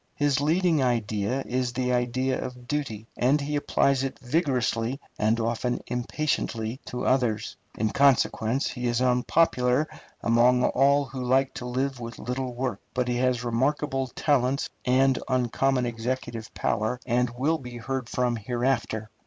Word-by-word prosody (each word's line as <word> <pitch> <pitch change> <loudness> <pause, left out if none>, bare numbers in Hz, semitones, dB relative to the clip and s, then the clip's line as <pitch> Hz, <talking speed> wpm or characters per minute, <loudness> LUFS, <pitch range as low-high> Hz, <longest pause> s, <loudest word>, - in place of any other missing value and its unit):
His 145 -1 +1
leading 165 +1 +2
idea 115 0 0
is 125 -1 -1
the 125 0 0
idea 125 +2 0
of 125 -1 -8
duty, 125 -8 -3
and 135 +5 +3
he 145 +1 -2
applies 140 -2 +2
it 135 - -3
vigorously 130 -3 0 0.2
and 110 +2 +2
often 120 +2 -1
impatiently 125 -2 -2
to 125 - -4
others. 115 -4 +1 0.2
In 110 0 0
consequence 135 -2 +3
he 125 -1 -3
is 120 0 +1
unpopular 125 +2 +2 0.4
among 120 +2 +4
all 140 +2 +3
who 130 -1 -6
like 130 +2 +2
to 125 - -6
live 130 +1 -1
with 115 -1 -7
little 125 0 -4
work. 125 -4 -2 0.2
But 125 -1 0
he 120 - 0
has 125 -1 +1
remarkable 135 +3 0
talents 135 0 0
and 130 +1 +3
uncommon 130 0 +1
executive 115 -1 -4
power, 110 +3 0
and 125 +1 +1
will 155 +5 +1
be 125 -2 -8
heard 130 0 -4
from 125 -2 0
hereafter. 120 -1 -1
125 Hz, 145 wpm, -26 LUFS, 120-135 Hz, 0.4 s, among